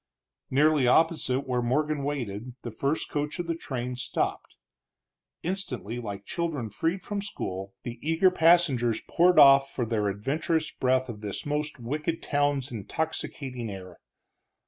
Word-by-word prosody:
Nearly 145 -1 +4
opposite 145 -2 +3
where 125 -3 -1
Morgan 145 +4 0
waited, 125 -4 -4
the 120 - -5
first 140 +7 -1
coach 150 0 -3
of 175 - -3
the 165 - -1
train 125 -6 -4
stopped. 125 - -2 0.9
Instantly, 130 - -3
like 100 -3 -6
children 150 -10 -3
freed 165 - -1
from 205 -1 -3
school, 95 - -5
the 120 -1 -6
eager 165 +4 +3
passengers 160 -10 +4
poured 175 0 +4
off 135 -2 +8
for 125 - -2
their 110 -2 0
adventurous 150 - -1
breath 130 0 +1
of 110 -4 -7
this 105 -3 -4
most 150 -1 -2
wicked 150 +7 -3
town's 145 -2 +1
intoxicating 125 0 -4
air. 95 -3 -9
135 Hz, 140 wpm, -27 LUFS, 120-155 Hz, 0.9 s, off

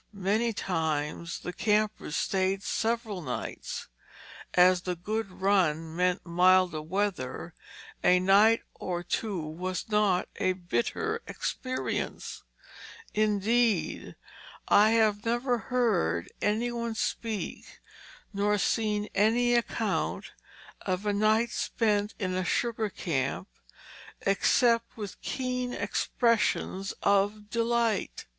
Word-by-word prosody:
Many 210 +5 +1
times 160 -4 -2
the 180 - -5
campers 210 -5 0
stayed 190 0 0
several 225 -4 -1
nights. 125 -6 -5 0.7
As 180 0 +6
the 180 0 -3
"good 215 +4 -3
run" 175 -5 +1
meant 180 0 +1
milder 180 -1 +4
weather, 180 -5 -3 0.5
a 180 0 +5
night 205 +5 +5
or 175 -1 -4
two 200 +1 -2
was 175 +5 -4
not 210 -4 +2
a 185 - +1
bitter 235 - -2
experience; 255 0 -3 0.7
indeed, 215 +2 +1 0.5
I 210 +1 +6
have 215 -2 +2
never 240 +1 0
heard 95 - +1
any 225 +4 +1
one 235 -1 -3
speak 220 -1 -4 0.5
nor 205 +1 +1
seen 210 +1 0
any 235 +4 +3
account 235 -1 -1 0.5
of 185 +1 -2
a 205 - +1
night 215 +3 +2
spent 210 -2 0
in 185 -3 -2
a 185 0 0
sugar 225 +2 0
camp 160 -8 -2 0.7
except 230 +4 +2
with 205 -3 -7
keen 250 -1 -2
expressions 205 -1 0
of 205 +1 +1
delight. 230 -2 0
205 Hz, 105 wpm, -28 LUFS, 185-225 Hz, 0.7 s, As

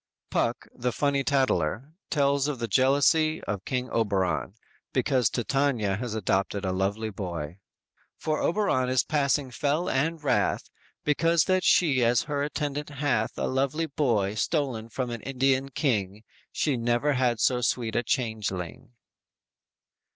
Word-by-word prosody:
"_ - - -53
Puck, - - 0
the 125 +1 -2
funny 140 +1 0
tattler, 130 - 0 0.2
tells 140 -1 +2
of 150 -3 -2
the 115 -1 -3
jealousy 145 - +3
of 100 -2 -4
King 125 -1 -2
Oberon, 100 -3 0 0.4
because 130 -4 +2
Titania 120 -5 0
has 115 -1 -4
adopted 100 -1 0
a 95 - 0
lovely 100 +4 -1
boy: 90 -3 -5 0.6
_"For 155 -1 -1
Oberon 165 -10 +1
is 130 -1 +3
passing 140 -2 0
fell 150 +6 0
and 155 +4 0
wrath, 145 - 0 0.3
Because 165 +2 +3
that 185 -1 +1
she 140 -8 +4
as 120 0 +3
her 145 -2 -2
attendant 145 0 -3
hath 140 -6 -1
A - - -1
lovely 135 +5 0
boy 120 -10 0
stolen 120 -2 -1
from 125 +1 -3
an 120 -2 -5
Indian 135 0 +1
king, 110 - -1 0.3
She 145 -5 0
never 120 +5 +1
had 125 -3 +1
so 125 +2 +2
sweet 120 -2 -1
a - - +3
changeling!" 110 - -3
130 Hz, 145 wpm, -27 LUFS, 110-145 Hz, 0.6 s, she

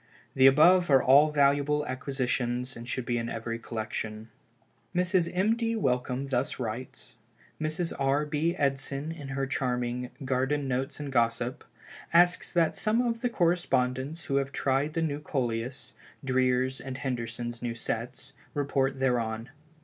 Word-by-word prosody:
The 130 0 +6
above 175 +6 +6
are 135 -2 +5
all 140 +4 +6
valuable 145 +1 +2
acquisitions 125 -1 -2
and 115 +1 -9
should 130 -2 -2
be 120 0 0
in 115 0 -3
every 115 0 -4
collection." 110 -1 -5 0.7
Mrs. 180 -1 +2
M. 195 +5 +2
D. 230 -1 -1
Wellcome 130 - 0
thus 130 0 -1
writes: 120 +1 -6 0.5
"Mrs. 160 +2 -1
R. 140 +2 +2
B. 155 +4 0
Edson 140 +1 -1
in 150 -4 -8
her 135 0 -2
charming 125 -2 -2 0.2
'Garden 135 +2 0
Notes 130 +2 -2
and 145 -2 -5
Gossip,' 120 0 0 0.5
asks 175 +1 +4
that 170 -3 +2
some 220 +2 +1
of 230 -1 -1
the 245 - +1
correspondents 160 - 0
who 140 - 0
have 140 0 -1
tried 140 +3 0
the 165 - +1
new 145 -2 -1
Coleus, 125 -3 -3 0.3
Dreer's 130 0 +1
and 130 -1 -6
Henderson's 120 -2 -4
new 120 -1 -3
sets, 120 +4 -4 0.2
report 135 -2 0
thereon. 120 -2 -1
135 Hz, 145 wpm, -28 LUFS, 125-150 Hz, 0.7 s, The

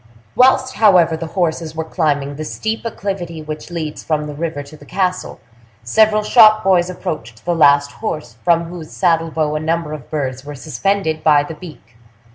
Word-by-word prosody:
Whilst, 260 0 +4
however, 180 -7 +5
the 165 +1 -5
horses 165 -2 -2
were 160 - -2
climbing 145 -4 -1
the 155 - -5
steep 220 +8 -3
acclivity 180 -7 -5
which 155 +2 -7
leads 160 -3 -5
from 150 -1 -1
the 150 - -6
river 155 -1 -4
to 140 +2 -13
the 150 - -16
castle, 185 +1 -2 0.4
several 215 - +3
shop 215 -1 +6
boys 185 -2 +3
approached 135 - -6
the 175 - +1
last 145 -3 +4
horse, 155 - -5
from 170 -1 +3
whose 170 -2 -9
saddle 165 -3 +1
bow 155 -1 -1
a 155 - -1
number 160 0 -2
of 145 -5 -9
birds 130 -4 -3
were 145 0 -8
suspended 160 +4 -2
by 150 -2 +5
the 155 - -7
beak. 150 -8 -13
160 Hz, 180 wpm, -18 LUFS, 150-180 Hz, 0.4 s, shop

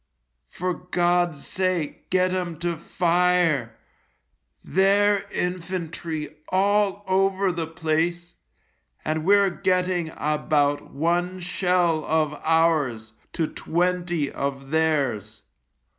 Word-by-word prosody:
For 180 +1 -2
God's 175 -3 0
sake 185 -5 -2
get 185 0 +2
'em 175 -3 -3
to 175 -1 -1
fire. 170 -8 +1 0.9
Their 200 +2 +2
infantry 170 -4 -4
all 200 +1 +2
over 195 0 +2
the 165 -2 -3
place, 165 +2 -1 0.7
and 155 0 -1
we're 200 0 +5
getting 180 -2 0
about 150 -1 0
one 175 +4 -1
shell 175 -2 +1
of 155 -1 +1
ours 155 -9 +1 0.2
to 165 - 0
twenty 175 -2 -1
of 135 0 -4
theirs. 135 -10 0
175 Hz, 95 wpm, -24 LUFS, 155-185 Hz, 0.9 s, we're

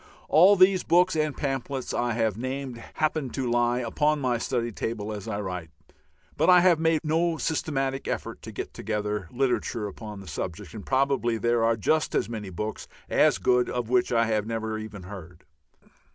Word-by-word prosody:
All 185 +6 +7
these 185 0 +5
books 180 +1 +3
and 155 -2 0
pamphlets 135 -1 -3
I 120 -1 0
have 110 -3 0
named 130 0 -5
happen 155 -3 0
to 130 +1 -3
lie 120 +1 +2
upon 150 +6 +1
my 125 -3 0
study 120 -1 -1
table 110 0 -4
as 105 0 -7
I 105 -2 -3
write, 90 -4 -5 0.7
but - - +2
I 180 -1 +8
have 175 -3 +4
made 160 -1 +2
no 165 +2 +1
systematic 135 -4 -1
effort - - -4
to - - -8
get - - -6
together 105 -4 -3
literature 125 -3 -1
upon 105 0 -8
the 95 - -11
subject, 85 +5 -5
and 105 -3 -7
probably 130 -3 +1
there 120 +1 +1
are 115 0 +2
just 155 +9 +1
as - - +1
many 105 -4 -5
books 105 +5 -5 0.2
as - - +4
good 125 0 +2
of 120 -2 -3
which 125 0 +2
I 115 -1 +3
have 110 -1 0
never 110 -1 -3
even 110 -3 -8
heard. 90 -3 -10
120 Hz, 180 wpm, -26 LUFS, 110-140 Hz, 0.7 s, I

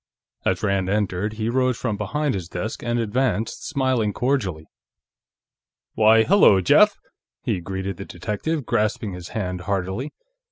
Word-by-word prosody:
As 95 +1 0
Rand 100 -2 +1
entered, 105 0 -1
he 110 0 -3
rose 130 0 +1
from 115 -5 -2
behind 135 +8 -1
his 90 -4 -5
desk 105 +6 -4
and 120 0 -1
advanced, 115 0 -1
smiling 130 -8 0
cordially. 105 - -1 1.3
"Why, 110 +1 +5
hello, 175 - +6
Jeff!" 90 - +5 0.5
he 90 - -1
greeted 95 +1 -4
the 95 - -7
detective, 115 - -3
grasping 105 -2 0
his 90 -1 -8
hand 90 -3 -4
heartily. 95 - -2
105 Hz, 135 wpm, -23 LUFS, 95-120 Hz, 1.3 s, hello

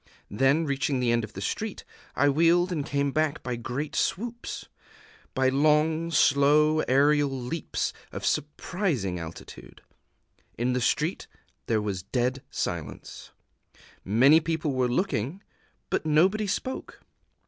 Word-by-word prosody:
Then, 135 +9 +2
reaching 140 -1 0
the 125 -2 +1
end 120 -1 +1
of - - -8
the - - -7
street, - - -3 0.3
I 145 - +3
wheeled 170 +5 +3
and 155 -5 -1
came 140 0 -1
back 155 +1 0
by 125 -1 -2
great 125 +5 -4
swoops, 235 +4 -2 0.7
by 130 -1 +3
long 155 +4 +2
slow 150 +1 +4
aerial 145 +2 +4
leaps 135 +4 -3 0.2
of - - -6
surprising 145 - -1
altitude. 80 0 -10 0.7
In 125 +2 0
the 125 - 0
street 155 +8 0 0.4
there 110 -2 +1
was 100 -3 -3
dead 125 +6 -1
silence: 75 -5 -5 0.7
many 130 +10 +5
people 160 -2 -2
were 130 -1 +1
looking; 160 - -1 0.5
but - - 0
nobody 185 +8 +3
spoke. 260 +7 -4
140 Hz, 125 wpm, -27 LUFS, 125-160 Hz, 0.7 s, many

